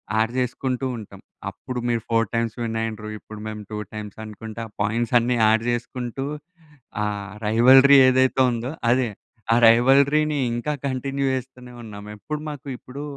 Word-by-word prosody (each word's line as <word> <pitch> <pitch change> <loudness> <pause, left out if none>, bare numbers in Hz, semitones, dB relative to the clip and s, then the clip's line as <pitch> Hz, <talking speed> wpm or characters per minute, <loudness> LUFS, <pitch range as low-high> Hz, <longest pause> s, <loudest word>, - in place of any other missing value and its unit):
Add 110 +2 +1
జేసుకుంటూ 130 +1 -2
ఉంటాం. 105 - -11 0.3
అప్పుడు 125 -1 -6
మీరు 115 -2 0
4 115 -2 +2
టైమ్స్ 115 -1 -1
విన్నయిండ్రు, 110 -1 -3
ఇప్పుడు 110 -1 -11
మేము 110 0 -6
2 105 - -4 0.2
టైమ్సనుకుంటా, 110 +1 -8
ఆ - - -31
పాయింట్సన్నీ 120 +3 +1
యాడ్ 110 +1 +3
జేసుకుంటూ, 120 +2 -3 0.8
ఆహ్, 100 -2 -4 0.2
రైవల్రీ 130 +5 +7
ఏదైతే 130 +1 +2
ఉందో 120 +3 -3 0.2
అదే. 125 -2 +2 0.4
ఆ - - +4
రైవల్రీని 140 +6 +4 0.2
ఇంకా 120 +6 -2 0.2
కంటిన్యూ 135 +1 -2
జేస్తూనే 125 -1 -7
ఉన్నాం. 105 -2 -9
ఎప్పుడు 150 +7 -5
మాకు 145 -1 -8
ఇప్పుడూ 140 +3 -9
120 Hz, 135 wpm, -23 LUFS, 110-130 Hz, 0.8 s, రైవల్రీ